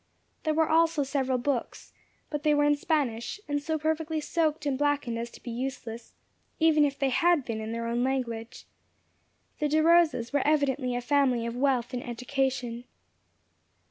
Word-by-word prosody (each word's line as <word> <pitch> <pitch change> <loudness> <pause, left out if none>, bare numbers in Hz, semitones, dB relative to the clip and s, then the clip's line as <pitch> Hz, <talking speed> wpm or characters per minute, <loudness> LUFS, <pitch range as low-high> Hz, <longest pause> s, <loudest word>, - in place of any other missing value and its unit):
There 310 -1 0
were 320 0 +3
also 325 -2 +3
several 265 -2 0
books, 250 -1 -3 0.4
but 295 -1 -2
they 300 0 +3
were 290 - +3
in 295 0 +4
Spanish, 285 - -1
and 290 0 -1
so 315 +2 -1
perfectly 315 +1 -1
soaked 310 -1 -1
and 280 -2 +1
blackened 285 -4 0
as 235 +1 -4
to - - -15
be 240 - -5
useless, 235 -2 -6 0.4
even 315 -2 +5
had - - -11
they 285 +4 +2
been 220 -2 -3
in 220 +1 -5
their 230 0 -3
own 235 +1 0
language. 240 -4 -3 0.9
The 300 - +1
De 310 +2 +3
Rosas 320 -7 +3
were 285 - +3
evidently 275 -4 +1
a 245 - -1
family 255 -3 +2
of 235 0 -4
wealth 255 -2 +1
and 245 - -3
education. 250 -1 -2
275 Hz, 170 wpm, -28 LUFS, 240-305 Hz, 0.9 s, even